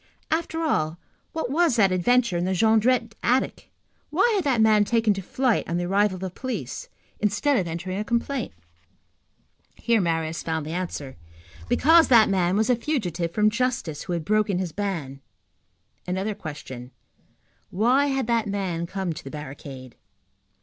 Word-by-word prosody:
After 325 0 -1
all, 160 - 0 0.3
what 320 -6 -3
was 325 -3 +3
that 200 -5 +4
adventure 235 +3 +2
in 175 - 0
the 190 0 0
Jondrette 225 +3 +3
attic? 255 +2 0 0.4
Why 480 - +3
had 395 -4 +1
that 260 -5 +2
man 215 -1 +5
taken 225 0 +2
to 195 - -5
flight 245 +3 0
on 170 - 0
the 175 - -1
arrival 195 +2 +2
of 185 - -9
the 190 -1 -4
police, 260 - -5 0.3
instead 215 +8 +1
of 185 -7 0
entering 175 +4 -4
a - - -1
complaint? 235 +2 -2 1.2
Here 230 -2 +1
Marius 165 -2 -1
found 160 -2 -3
the 155 - -5
answer. 165 - -5 0.5
Because 325 +3 +5
that 230 -4 +6
man 185 -1 +1
was 220 +1 +2
a - - +4
fugitive 195 - -2
from 210 +3 +3
justice, 250 - -1
who 180 - -3
had 170 -2 -3
broken 210 -2 +1
his 180 -2 -2
ban. 160 -9 -4 0.9
Another 190 +4 -1
question: 145 -9 -8 0.8
Why 245 +9 +3
had 270 -2 0
that 230 -1 +1
man 185 -4 -2
come 190 -2 -3
to - - -9
the 135 - -8
barricade? 135 -3 -9
205 Hz, 165 wpm, -25 LUFS, 170-240 Hz, 1.2 s, that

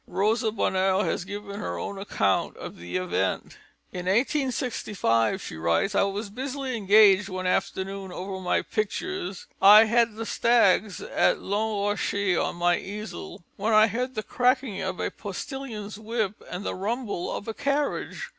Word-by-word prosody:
Rosa 220 +3 +1
Bonheur 190 -2 +1
has 180 - -2
given 205 0 -6
her 85 0 -4
own 195 - -5
account 100 - 0
of - - -8
the 90 - -4
event: 175 - -2 0.3
"In 180 0 -5
1865," 225 - +1
she - - -7
writes, 85 - +1
"I - - +3
was 200 +1 -2
busily 265 +2 -4
engaged 205 -1 +5
one 185 0 -4
afternoon 190 +1 -2
over 190 +1 -5
my 180 -1 0
pictures 355 - -3 0.2
(I 210 +3 +10
had 230 0 +2
the 225 +1 -5
Stags 220 -4 +3
at - - +2
Long 205 0 -1
Rocher 200 -2 0
on - - -2
my 175 0 +2
easel), 210 -3 -7
when 215 +3 0
I 215 0 +7
heard 250 +5 -3
the 215 - -2
cracking 250 -3 +1
of 190 -1 -3
a - - -1
postillion's 215 0 -6
whip 220 -2 -2
and 180 +3 -5
the - - -2
rumble 210 -1 -3
of 205 - -5
a 225 - -3
carriage. 285 +3 -2
205 Hz, 155 wpm, -26 LUFS, 190-225 Hz, 0.3 s, I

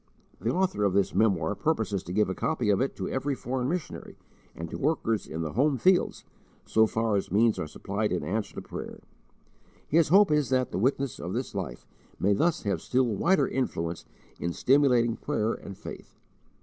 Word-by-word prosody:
The 115 - -1
author 185 - 0
of 100 -2 +2
this 100 0 +2
memoir 100 -5 +2
purposes 110 - -1
to 90 - -6
give 105 +3 +2
a 95 - -2
copy 125 -3 0
of 100 - +2
it 135 - -1
to - - -4
every 135 +1 -1
foreign 125 0 -2
missionary, 175 -1 -5 0.4
and 85 - -5
to - - -4
workers 125 -7 0
in 80 +1 -4
the 80 - -4
home 135 +4 +2
fields, 185 +6 +2 0.4
so 110 0 +4
far 110 -1 0
as 95 - -3
means 110 +3 +3
are 75 - -3
supplied 100 +6 -3
in 90 - -1
answer 105 +1 -3
to - - -5
prayer. - - -8 0.8
His 165 +1 +3
hope 195 +2 +5
is 150 -3 +2
that 130 -1 +1
the 90 - -2
witness 135 +2 0
of - - -5
this - - -3
life - - -5 0.3
may 100 +2 +3
thus 165 - +1
have 100 -6 -1
still 130 +1 +1
wider 125 - +2
influence 85 - -2 0.3
in 85 - -2
stimulating 125 -3 +3
prayer 115 -6 -1
and 100 - -9
faith. - - -10
115 Hz, 190 wpm, -28 LUFS, 100-140 Hz, 0.8 s, hope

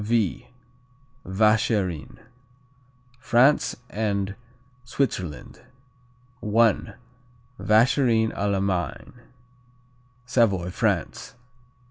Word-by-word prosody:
V 110 -3 -1 0.8
Vacherin 105 -4 0 1.0
France 125 +4 +3
and 100 -3 -2 0.5
Switzerland 115 - -4 0.8
I. 110 0 +2 0.7
Vacherin 115 0 +3
à 100 0 -1
la 100 - 0
Main. 90 -6 -3 1.1
Savoy, 100 -8 +1
France. - - -2
105 Hz, 60 wpm, -24 LUFS, 95-115 Hz, 1.1 s, France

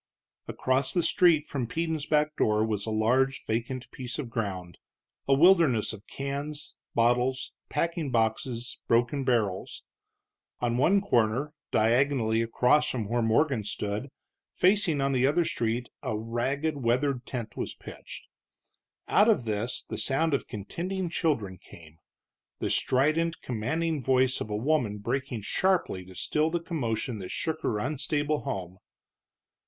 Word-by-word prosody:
Across 130 +3 +1
the 175 - +3
street 165 -4 +4
from 130 -6 -3
Peden's 160 +1 -2
back 150 0 +2
door 105 0 +2
was 105 -1 -2
a - - -1
large 125 +5 +1
vacant 120 +3 -2
piece 125 -1 -6
of 130 -6 -5
ground, 95 -7 -4 0.5
a 135 - +5
wilderness 160 - +4
of 105 -1 -12
cans, 140 +2 -5 0.2
bottles, 125 +3 +2 0.2
packing 165 -3 -1
boxes, 115 +1 -1
broken 120 +4 +2
barrels. 110 -7 -1 0.8
On 120 -1 0
one 190 +9 +4
corner, 125 - +1 0.2
diagonally 115 0 +2
across 125 +6 +3
from 115 -5 -2
where 120 +1 +1
Morgan 115 +2 +2
stood, 105 +4 -3 0.5
facing 185 -6 +3
on 135 0 +1
the 130 0 +3
other 165 +4 +2
street, 120 -1 -1
a 125 -6 -2
ragged, 135 +7 -1
weathered 130 +1 0
tent 120 -4 -5
was - - -4
pitched. - - -10 0.8
Out 210 +3 +5
of 205 - +2
this 110 +3 -2
the - - -5
sound 155 +4 +1
of 140 - 0
contending 175 - -4
children 110 - -1
came, 80 -1 -15 0.6
the - - -2
strident, 155 +6 +1
commanding 145 +7 -1
voice 130 0 +2
of - - -4
a 105 - -2
woman 125 -4 +1
breaking 120 +1 -3
sharply 180 - +1
to 95 0 -13
still 155 - 0
the 170 +1 -1
commotion 125 - -3
that 95 - -7
shook 160 -1 -2
her 110 - 0
unstable 145 +4 -1
home. 95 -9 -5
130 Hz, 140 wpm, -28 LUFS, 115-150 Hz, 0.8 s, a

